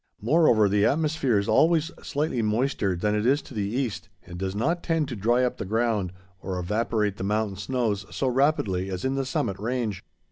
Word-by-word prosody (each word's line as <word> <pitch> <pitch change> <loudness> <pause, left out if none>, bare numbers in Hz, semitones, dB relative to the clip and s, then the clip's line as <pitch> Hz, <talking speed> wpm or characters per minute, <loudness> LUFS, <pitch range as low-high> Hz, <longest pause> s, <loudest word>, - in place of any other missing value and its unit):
Moreover, 115 -4 +4
the 100 +1 +2
atmosphere 150 -5 +2
is 100 - 0
always 165 +1 +3
slightly 145 -4 -1
moister 110 -3 0
than 105 +4 0
it 105 0 0
is 135 +5 +3
to - - -12
the 105 -2 -1
east, 120 -4 -3 0.2
and 85 0 -9
does 95 0 -3
not 165 +11 0
tend 165 -3 0
to 125 - -4
dry 120 +5 +2
up 125 - -1
the - - -4
ground 110 -3 0 0.3
or 95 -1 -4
evaporate 105 +2 -1
the - - -5
mountain 105 0 0
snows 105 -3 -1
so 135 - -2
rapidly 125 -9 +1
as 95 +2 -4
in 130 - +1
the 135 -1 -2
summit 100 -7 -2
range. 110 -3 -2
110 Hz, 200 wpm, -26 LUFS, 100-135 Hz, 0.3 s, Moreover